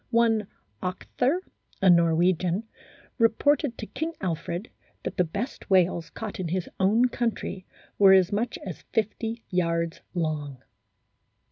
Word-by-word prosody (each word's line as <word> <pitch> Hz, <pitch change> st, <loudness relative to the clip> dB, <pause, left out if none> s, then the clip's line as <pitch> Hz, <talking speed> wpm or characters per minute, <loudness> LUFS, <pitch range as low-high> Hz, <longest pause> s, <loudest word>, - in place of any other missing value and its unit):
One 230 Hz, -3 st, +3 dB, 0.3 s
Octher, 250 Hz, -, -1 dB, 0.4 s
a 195 Hz, -, +3 dB
Norwegian, 175 Hz, +2 st, +4 dB, 0.6 s
reported 255 Hz, +4 st, +3 dB
to 215 Hz, -, -5 dB
King 320 Hz, +8 st, -4 dB
Alfred 175 Hz, +2 st, -3 dB, 0.3 s
that -, -, -5 dB
the 180 Hz, -, +4 dB
best 200 Hz, -, -5 dB
whales 180 Hz, -3 st, +3 dB
caught 220 Hz, -3 st, -6 dB
in 180 Hz, -, -2 dB
his 180 Hz, +2 st, -2 dB
own 210 Hz, +6 st, +4 dB
country 230 Hz, -5 st, -3 dB, 0.3 s
were 195 Hz, -1 st, +8 dB
as 190 Hz, 0 st, +5 dB
much 225 Hz, +4 st, -1 dB
as 185 Hz, -5 st, -6 dB
50 225 Hz, +1 st, -1 dB
yards 170 Hz, -2 st, 0 dB
long. 150 Hz, -6 st, -2 dB
190 Hz, 125 wpm, -26 LUFS, 170-230 Hz, 0.6 s, were